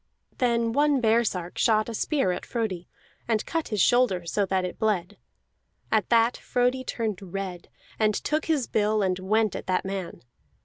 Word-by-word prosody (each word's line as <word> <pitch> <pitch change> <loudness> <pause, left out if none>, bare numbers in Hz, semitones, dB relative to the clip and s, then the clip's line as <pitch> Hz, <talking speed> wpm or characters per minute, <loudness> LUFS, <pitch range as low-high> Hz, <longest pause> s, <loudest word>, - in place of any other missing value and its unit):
Then 235 -2 +1
one 290 0 +3
baresark 220 -7 +1
shot 215 -1 +3
a 230 - -5
spear 245 - 0
at 180 - -4
Frodi, 205 -7 -3 0.4
and 225 -2 0
cut 330 -2 -2
his 210 -3 -2
shoulder 230 -8 +3
so 200 +3 0
that 185 -1 0
it 180 - -6
bled. 200 -5 0 0.8
At 215 -4 +2
that 230 +1 +3
Frodi 250 +1 0
turned 220 -6 -3
red, 185 -1 -6 0.3
and 215 -1 +2
took 305 +7 -1
his 300 -6 +1
bill, 215 -1 +1
and 185 -1 0
went 215 +2 +1
at - - -6
that 185 0 0
man. 190 -8 -5
215 Hz, 170 wpm, -26 LUFS, 190-235 Hz, 0.8 s, one